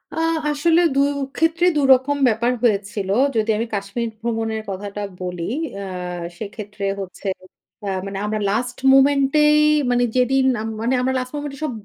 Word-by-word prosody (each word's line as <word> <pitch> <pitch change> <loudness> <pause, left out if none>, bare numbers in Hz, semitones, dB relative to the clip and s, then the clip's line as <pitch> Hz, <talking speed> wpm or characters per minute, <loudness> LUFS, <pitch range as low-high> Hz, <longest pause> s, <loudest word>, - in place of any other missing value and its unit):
আ - - -7 0.3
আসলে 330 +4 +3
২ 275 - +3 0.4
ক্ষেত্রে 325 +2 +2
২ - - +3
রকম 265 +3 +1
ব্যাপার 235 +1 +1
হয়েছিল। 200 -3 0 0.3
যদি 220 0 0
আমি 230 - -1
কাশ্মীর 200 +4 -3
ভ্রমণের 225 -1 -2
কথাটা 200 +1 -5 0.2
বলি, 180 0 -4 0.3
আ - - -5 0.5
সেক্ষেত্রে 210 -1 -6
হচ্ছে, 195 +1 -7 0.6
আ - - -1 0.2
মানে 195 0 -5
আমরা 215 0 -2
লাস্ট 245 +3 -2 0.2
মোমেন্ট 275 0 +4 0.2
এই 300 0 +5 0.3
মানে 245 0 +2
যেদিন, 260 +1 +3 0.6
আমরা 260 +1 0
লাস্ট 255 +1 -6
মোমেন্ট 290 -1 -4
এ - - -13
সব 305 - -1
235 Hz, 150 wpm, -21 LUFS, 205-270 Hz, 0.6 s, এই